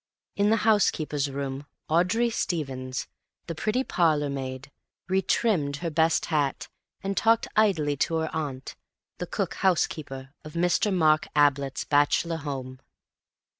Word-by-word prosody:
In 200 +1 +2
the 220 - +4
housekeeper's 155 -9 +2
room 140 0 -5 0.2
Audrey 185 +9 +2
Stevens, 130 - -3 0.4
the 165 - -4
pretty 215 +10 0
parlour 155 - +1
maid, 130 0 -5 0.4
re 190 +1 +2
trimmed 175 -8 +1
her 165 +3 -4
best 160 +1 +2
hat, 145 -3 0 0.3
and 195 0 -2
talked 225 +2 +3
idly 170 -9 +2
to 165 - 0
her 160 0 -2
aunt, 140 -4 -4 0.4
the - - -4
cook - - -2
housekeeper 145 -7 -1
of 155 - -10
Mr. 175 +4 +2
Mark 155 -4 +3
Ablett's 140 -2 +2
bachelor 145 +3 +2
home. 135 -4 -6
155 Hz, 130 wpm, -26 LUFS, 140-180 Hz, 0.4 s, the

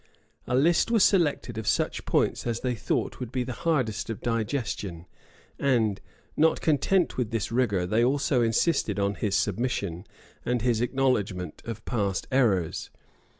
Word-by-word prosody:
A 125 - 0
list 165 - +3
was 225 -4 +4
selected 145 - +2
of 110 - -6
such - - 0
points - - 0
as 115 -1 -2
they 125 -1 0
thought 115 - -2
would 125 -3 -5
be 130 -1 -1
the 125 +1 -5
hardest 130 -12 -1
of 115 - -4
digestion; 110 - -3 0.5
and, 115 -7 +1 0.3
not 160 +1 +3
content 165 +4 +1
with 125 -4 -1
this 115 -2 -2
rigor, 110 -7 +1
they 110 +6 +2
also 135 0 +2
insisted 115 - +1
on 100 0 +1
his 100 +1 -1
submission, 100 -5 -1 0.4
and 125 -2 -1
his 120 -3 +1
acknowledgment 120 -8 -1
of 110 -2 -6
past 100 -6 -1
errors. 105 -11 +1
120 Hz, 150 wpm, -27 LUFS, 105-130 Hz, 0.5 s, was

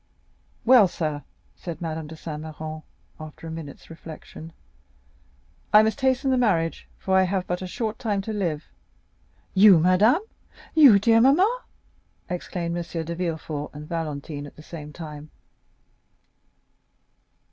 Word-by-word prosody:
"Well, 240 -4 +7
sir," 155 -5 -3 0.3
said 170 -3 -7
Madame 160 -2 -4
de 160 - -9
Saint 155 -1 -7
Méran, 155 0 -7 0.4
after 155 +1 -10
a 165 - -6
few - - -5
minutes' 150 -4 -9
reflection, 160 0 -10 1.2
"I 210 +1 +8
must 220 +5 -1
hasten 265 +1 +2
the 260 - +2
marriage, 170 -9 0
for 190 - 0
I 190 - +6
have 185 0 0
but 180 +1 -3
a 185 - -4
short 220 +3 -4
time 210 -4 -1
to 220 - -4
live." 170 -7 -2 0.9
"You, 195 -1 +8
madame?" 195 - +4 0.5
"You, 280 -10 +8
dear 225 +3 +4
mamma?" 375 - +3 0.7
exclaimed 170 -1 -3
M. 170 -1 -4
de 170 - -4
Villefort 160 -4 -4
and 150 +1 -8
Valentine 150 -3 -4
at - - -15
the 155 - -13
same 150 -3 -9
time. 150 -1 -9
170 Hz, 140 wpm, -24 LUFS, 155-210 Hz, 1.2 s, I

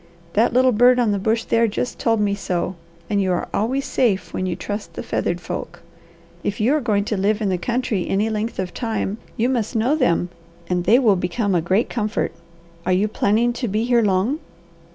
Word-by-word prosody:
That 225 +3 +3
little 255 +1 +4
bird 245 +2 +5
on 240 -4 +2
the 200 - 0
bush 225 +3 +1
there 230 0 +2
just 235 +4 -3
told 225 -2 +2
me 205 -1 +1
so, 185 -2 -2 0.3
and 205 -2 +1
you 190 -1 +1
are 175 - -2
always 260 +6 0
safe 200 -8 0
when 185 - -2
you 175 - -1
trust 205 +3 -5
the - - -5
feathered - - -1
folk. - - -6 0.6
If 205 - -2
you 230 +6 +3
are 305 - +1
going 205 -5 +1
to 210 - -1
live 205 +2 +1
in 210 -3 0
the 180 -1 0
country 235 -2 -1
any 205 +3 +1
length 220 +1 -2
of 185 -2 -3
time, 220 -2 -2 0.2
you 230 - +2
must 240 -4 -1
know 240 +7 +2
them, 180 - +1 0.4
and 180 0 -1
they 220 +6 +6
will 225 -7 +4
become 190 +3 -1
a 175 - +2
great 190 +8 +1
comfort. 215 -2 -1 0.5
Are 185 - 0
you 195 +4 +2
planning 220 +3 +1
to 245 0 -3
be 215 +2 0
here 240 -1 +3
long?" 210 +8 +1
215 Hz, 215 wpm, -21 LUFS, 195-235 Hz, 0.6 s, they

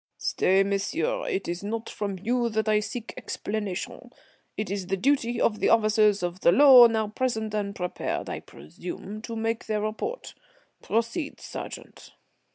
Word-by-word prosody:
"Stay, 190 +1 +2
monsieur, 315 - -1
it 390 -6 -2
is 175 +2 -4
not 225 +2 -3
from 200 -3 -4
you 235 +5 0
that 220 0 -1
I 215 -1 +4
seek 225 +2 -6
explanation. 205 -3 -4 0.5
It 215 -3 -3
is 195 -2 -3
the 195 +1 0
duty 245 0 +1
of 215 -2 +1
the - - +2
officers 215 -3 +4
of 175 +1 -3
the 170 - +5
law 260 +1 +9
now 220 -2 0
present, 220 -2 -2
and 200 -1 -2
prepared, 180 -1 -3
I - - -4
presume, 180 - -9
to 230 0 -6
make 225 0 -2
their 215 -1 0
report. 215 - -4 0.5
Proceed, 230 +7 -2
sergeant." - - -9
215 Hz, 160 wpm, -26 LUFS, 200-235 Hz, 0.5 s, law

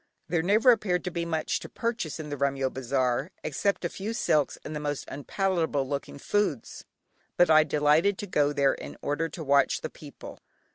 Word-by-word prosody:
There 165 -1 +1
never 215 +8 +5
appeared 195 -6 +1
to 180 - -3
be 170 0 -2
much 160 -2 -1
to - - -9
purchase 230 -10 -3
in 155 -1 -6
the 145 - -3
Remyo 135 -1 0
bazaar 130 +2 0
except 180 +5 -1
a - - 0
few 205 +6 -5
silks 150 -10 +1
and 155 - -5
the - - -2
most 145 -1 -3
unpalatable 160 -2 -1
looking 140 0 -4
foods, 155 - -2 0.5
but 175 -2 +5
I 155 0 +7
delighted 155 +6 +3
to - - -5
go 145 -6 +1
there 140 -1 +2
in 70 +1 -8
order 160 +3 -1
to 165 - -7
watch 140 -1 +3
the - - -5
people. - - -11
155 Hz, 190 wpm, -27 LUFS, 140-180 Hz, 0.5 s, I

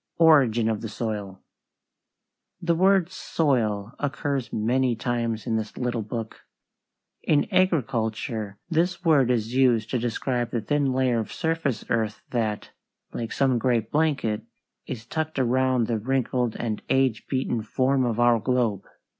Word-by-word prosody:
ORIGIN 135 -9 +5
OF 110 -2 -1
THE 115 - -5
SOIL 105 -4 -5 1.2
The 170 -1 +1
word 185 0 +3
soil 115 - 0
occurs 140 -2 -2
many 120 +3 +1
times 115 -1 -2
in 115 -2 0
this 110 -1 -5
little 125 -2 -1
book. 110 +1 -6 0.8
In 145 -2 +2
agriculture 115 - 0
this 175 +1 0
word 145 -6 +4
is 115 -1 0
used 120 -4 +3
to 125 - +1
describe 120 +1 -1
the 120 - -1
thin 140 +4 +1
layer 130 -2 +1
of 110 - -4
surface 160 -6 -1
earth 110 -2 -1
that, 110 -4 -2 0.4
like 115 -1 -4
some 130 -3 +2
great 120 -3 0
blanket, 145 -9 +1 0.5
is 110 -3 -6
tucked 160 +5 -3
around 130 -1 +2
the 115 -1 -1
wrinkled 125 0 0
and 110 -3 -3
age 130 -4 +1
beaten 130 -3 -1
form 130 +5 +1
of 120 -2 -1
our 120 -1 +4
globe. 115 -4 0
120 Hz, 140 wpm, -25 LUFS, 110-135 Hz, 1.2 s, ORIGIN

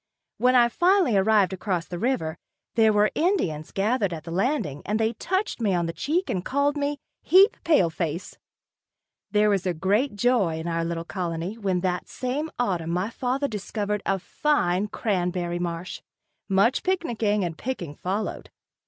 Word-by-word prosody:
When 250 +1 +4
I 240 -1 +6
finally 350 - +3
arrived 195 -1 +3
across 185 -3 -2
the 175 - -6
river, 180 -10 -1 0.3
there 220 -2 +4
were 210 0 +3
Indians 245 - 0
gathered 205 0 +1
at 155 -2 -6
the 165 - -8
landing 190 - -1
and 210 +2 -1
they 225 +1 +1
touched 375 - -2
me 200 -4 +2
on 170 -1 +1
the 165 - -3
cheek 340 - -1
and 180 - -2
called 280 +4 +1
me 290 0 -1 0.2
"heap 395 +6 +6
pale 240 - +3
face." 165 +1 -4 0.9
There 210 0 +3
was 195 -2 0
great 205 - +1
joy 205 -7 +2
in 160 +1 -5
our 165 0 -1
little 165 0 -3
colony 175 +1 -3
when 190 -5 -1
that 180 -1 -1
same 275 +5 -3
autumn 180 -9 -1
my 180 +6 -1
father 260 +4 -1
discovered 210 -2 -3
a 195 - +2
fine 195 -4 0
cranberry 180 -4 -1
marsh. 170 0 -4 0.5
Much 200 +7 +3
picnicking 230 - 0
and 170 -2 -3
picking 180 - -4
followed. 190 +7 -4
205 Hz, 160 wpm, -25 LUFS, 175-250 Hz, 0.9 s, I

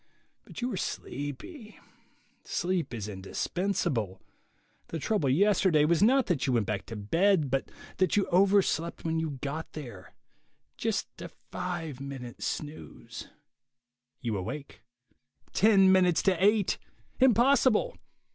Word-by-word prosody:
But - - -8
you 250 - -1
are 195 - -3
sleepy; 195 - -6 0.7
sleep 180 -1 -1
is 110 -4 -5
indispensable; 105 - -2 0.7
the 165 - -4
trouble 160 -3 0
yesterday 185 -1 +4
was 165 +1 +2
not 255 +5 +5
that 145 -6 0
you 130 - +2
went 115 -3 +2
back 100 0 -3
to 115 - -6
bed, 160 - +2
but 135 0 -1 0.3
that 185 +2 +2
you 200 - +3
overslept 185 -4 +2
when 160 0 0
you 160 -1 -1
got 150 +3 -4
there; 115 - -9 0.6
just - - -3
a - - -6 0.2
five 165 -7 -4
minute 135 -3 -7
snooze... 150 +1 -6 0.9
You 115 -4 -2
awake. 130 +10 -6 0.7
Ten 195 -3 +5
minutes 180 -3 +4
to 185 -2 +2
eight! 205 -1 +3 0.4
Impossible! 260 - +4
165 Hz, 125 wpm, -29 LUFS, 135-200 Hz, 0.9 s, not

